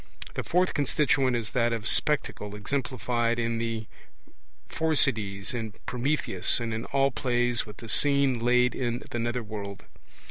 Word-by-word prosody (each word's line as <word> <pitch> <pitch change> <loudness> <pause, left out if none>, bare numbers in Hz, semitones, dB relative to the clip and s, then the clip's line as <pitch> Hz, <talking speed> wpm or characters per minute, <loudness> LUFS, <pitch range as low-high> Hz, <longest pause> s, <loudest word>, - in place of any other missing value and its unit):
The - - -3
fourth 180 +1 +1
constituent 135 -3 +2
is 115 -2 -3
that 120 -1 +1
of 115 -2 -3
'Spectacle', 105 -8 +2
exemplified 120 0 -1
in 115 -1 -1
The 115 -1 -3 0.8
Phorcides, 110 - +1
in 110 -3 -4
Prometheus, 125 -7 0
and 115 -1 -3
in 110 +1 -3
all 135 0 +2
plays 120 -2 0
with 105 - -11
the 115 - -10
scene 140 0 +4
laid 125 +1 +3
in 120 -2 -2
the 120 - -2
nether 120 +1 -2
world. 100 -2 -7
120 Hz, 145 wpm, -27 LUFS, 110-130 Hz, 0.8 s, scene